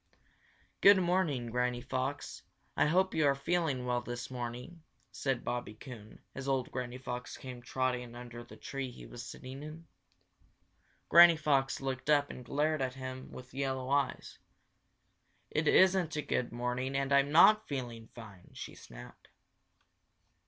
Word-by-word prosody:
"Good 200 0 +8
morning, 170 -10 0
Granny 125 0 0
Fox. 130 +3 -3 0.3
I - - +3
hope 185 +4 +2
you 155 -2 +3
are 140 - +3
feeling 140 -3 0
well 125 0 0
this 120 +1 -6
morning," 125 +7 -6 0.3
said 130 -3 -2
Bobby 120 -3 -3
Coon, 110 -2 -11
as 130 +1 -6
old 135 -2 0
Granny 125 0 -4
Fox 125 -1 -6
came 125 -2 -8
trotting 125 -1 -2
under 120 -1 -8
the 120 - -14
tree 135 -2 -5
he 125 - -11
was 120 - -9
sitting 130 +3 -9
in. 155 +2 -9 1.2
Granny 170 0 +8
Fox 140 -4 +1
looked 135 +1 -4
up 145 -1 +3
and 125 - -9
glared 150 +4 0
at 130 -1 -2
him 130 0 -7
with 125 0 -11
yellow 130 -1 -2
eyes. 140 -1 -1 1.1
"It 155 +1 0
isn't 185 -3 +4
a 150 - -2
good 125 -3 -1
morning 125 +3 -2
and 135 0 0
I'm 140 +1 +4
not 215 +7 +7
feeling 120 -5 -5
fine!" 100 -6 -12
she - - -8
snapped. - - -13
130 Hz, 150 wpm, -32 LUFS, 125-145 Hz, 1.2 s, Good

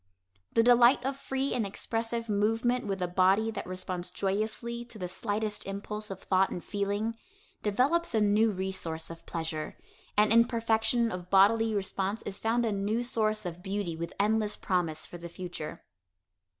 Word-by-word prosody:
The 230 - +5
delight 245 +2 +6
of 270 0 -1
free 270 0 -2
and 240 - +1
expressive 230 +3 -2
movement 225 +3 +1
with 195 -2 -2
a - - 0
body 190 +5 +3
that - - -6
responds 185 -1 -3
joyously 220 +4 -2
to 235 -2 -11
the 180 -3 -3
slightest 210 +2 -2
impulse 210 +2 -5
of 195 -1 -7
thought 190 0 +3
and 175 - -5
feeling, 205 +2 -1 0.5
develops 260 +10 +2
a - - +4
new 210 +2 +4
resource 185 -5 -3
of 165 - -11
pleasure, 160 -2 -3 0.4
and 210 +1 +5
in 230 0 +7
perfection 230 0 +1
of 180 -1 -6
bodily 215 +3 +5
response 195 +1 -2
is 200 0 -4
found 235 +2 +1
a 225 - 0
new 205 +4 0
source 215 -4 0
of 175 0 -5
beauty 195 -3 -3
with 170 +1 -5
endless 210 +1 +2
promise 165 -4 -1
for 175 - -10
the 170 0 -7
future. 175 -3 -7
210 Hz, 165 wpm, -29 LUFS, 190-225 Hz, 0.5 s, in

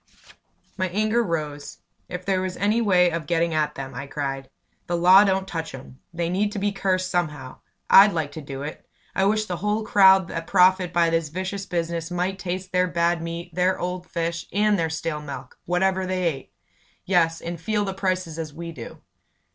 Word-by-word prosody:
My 185 -1 0
anger 215 +5 +1
rose. 150 -6 -4 0.3
"If 180 0 -6
there 190 -1 +1
was 185 -1 -4
any 210 +4 +2
way 180 -5 +4
of 165 -2 -4
getting 170 -1 +1
at 150 -1 0
them!" 135 -1 -6
I 135 +3 -6
cried. 135 -2 -4 0.4
"The 175 - 0
law 185 +3 +7
don't 190 -1 0
touch 165 -5 -5
'em. 130 0 -12
They 170 0 -2
need 200 +4 0
to - - -5
be 205 +1 0
cursed 185 -2 -1
somehow! 150 -7 -3 0.3
I'd 200 +2 +8
like 160 -4 -2
to 155 - -7
do 140 -1 -7
it! 150 - -7 0.3
I 190 - +1
wish 215 +2 +2
the 180 -4 -4
whole 210 +4 -1
crowd 190 -3 +6
that 165 0 -5
profit 185 -1 +4
by 170 -1 +2
this 165 -2 0
vicious 190 +4 -4
business 170 -1 -2
might 180 +2 -2
taste 185 0 -4
their 180 0 +2
bad 170 -1 +1
meat, 170 +1 -6
their 180 +2 +1
old 180 0 -4
fish, 170 0 -3
their 205 -4 +1
stale 160 -1 -3
milk 140 -3 -9
whatever 185 +1 +1
they 185 0 -1
ate. 150 -6 -3 0.5
Yes, 165 -3 +2
and 170 -1 -6
feel 210 +3 0
the 195 - -3
prices 185 -4 -2
as 160 -2 -4
we 165 +2 -7
do!" 125 -8 -10
175 Hz, 195 wpm, -24 LUFS, 165-190 Hz, 0.5 s, I'd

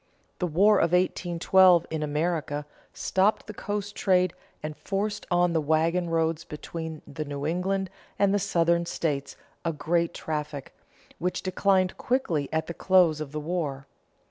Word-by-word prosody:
The 180 - 0
War 200 +6 +4
of 170 +1 +2
1812 180 0 +4
in 160 -1 -2
America 150 -1 -1 0.3
stopped 195 +3 +1
the 215 - -8
coast 205 0 -4
trade 185 -3 +2 0.3
and 155 0 -4
forced 205 +3 -3
on 175 -1 +3
the 160 - +2
wagon 165 +3 +1
roads 165 -1 0
between 160 +1 -7
the 145 +1 -5
New 140 -1 -5
England 185 +3 -1 0.3
and 200 -1 +3
the 205 - +3
Southern 170 -3 +1
states 140 -5 -2 0.3
a 165 - 0
great 170 +2 0
traffic, 150 -3 -4 0.5
which 180 +2 -2
declined 185 0 +1
quickly 175 - 0
at 160 0 0
the 170 - -5
close 175 -3 +3
of 145 -3 -5
the 155 - -3
war. 150 -4 -3
170 Hz, 150 wpm, -27 LUFS, 155-185 Hz, 0.5 s, War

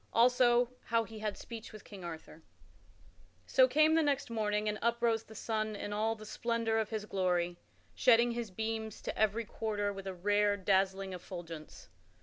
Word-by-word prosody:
Also 245 0 +4
how 230 -1 +2
he 220 -1 -10
had 210 -1 -3
speech 230 -2 -8
with 215 -2 -11
King 195 -3 -11
Arthur._ 165 -1 -8 1.0
So 260 - +5
came 310 +4 +4
the 325 - +4
next 280 -5 0
morning, 210 -1 0
and 210 0 -1
uprose 235 -1 +1
the 220 - -13
sun 215 -1 -2
in 205 0 -5
all 220 +2 0
the 215 -1 -11
splendor 230 0 0
of 220 -1 -1
his 215 -2 -3
glory, 180 -3 0 0.3
shedding 240 -1 +5
his 235 -2 -3
beams 220 +2 -4
to - - -4
every 220 +2 +1
quarter 205 -2 -2
with 195 0 -8
a 190 - -4
rare 205 +2 +2
dazzling 190 0 +1
effulgence. 170 -3 -8
215 Hz, 170 wpm, -33 LUFS, 195-230 Hz, 1.0 s, So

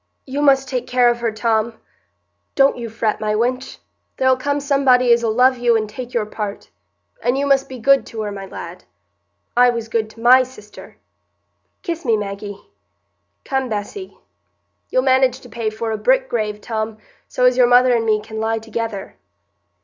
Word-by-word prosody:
"You 280 +2 -3
must 270 -2 +4
take 255 -1 -3
care 250 -1 +3
of 240 - -4
her, 235 -1 -1
Tom—don't 225 +5 -2
you 235 -2 -6
fret, 220 -1 -2
my 215 0 0
wench—there'll 260 +2 -2
come 285 +3 -2
somebody 270 -4 +3
as'll 235 -1 +1
love 250 +2 +3
you 240 -1 +3
and 215 -1 -2
take 245 +3 -8
your 230 -4 -1
part—and 215 +4 -6
you 280 - 0
must 275 -1 +2
be 260 - -7
good 270 +1 +4
to 225 - -6
her, 205 - -4
my 195 -1 -7
lad. - - -9 0.7
I 245 +1 +6
was 230 -2 -3
good 220 -1 -1
to 220 - -17
my 250 +3 +6
sister. 245 -5 -11 0.9
Kiss 340 -4 -4
me, 230 -5 +2
Maggie.—Come, 205 +5 -7
Bessy.—You'll 255 - -6
manage 260 -1 +3
to 245 - -14
pay 230 -1 -3
for 220 +1 -4
a 220 - -3
brick - - +2
grave, 210 -2 -2
Tom, 220 -1 -4 0.3
so 250 - 0
as 250 0 +4
your 250 -1 +5
mother 245 +1 +5
and 230 -1 +1
me 215 -1 +1
can 220 0 -7
lie 225 +1 0
together." 225 -2 -5
240 Hz, 165 wpm, -19 LUFS, 220-260 Hz, 0.9 s, I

